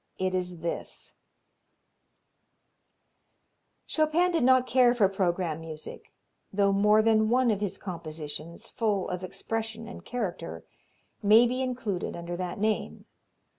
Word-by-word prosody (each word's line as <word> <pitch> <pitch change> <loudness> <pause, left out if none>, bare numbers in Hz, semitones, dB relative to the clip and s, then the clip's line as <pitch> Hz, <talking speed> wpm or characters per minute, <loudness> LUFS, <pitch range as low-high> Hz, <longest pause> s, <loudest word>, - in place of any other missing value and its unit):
It 185 0 -1
is 180 -2 -2
this: 170 - -5 2.7
Chopin 315 +3 +2
did 330 -7 +1
not 255 0 +5
care 250 -1 +4
for 210 -5 +4
programme 180 -4 -1
music, 155 -1 -9 0.4
though 200 0 +2
more 210 +2 +4
than 220 -1 +3
one 250 0 +3
of 205 -1 -1
his 205 -3 -2
compositions, 165 +2 -7
full 210 -5 -1
of 180 0 -4
expression 225 +3 -4
and 235 - -9
character, 180 - -4 0.6
may 215 +3 +7
be 250 +2 -1
included 240 -8 -3
under 170 0 -5
that 180 0 -4
name. 215 +1 -1
205 Hz, 125 wpm, -28 LUFS, 180-235 Hz, 2.7 s, may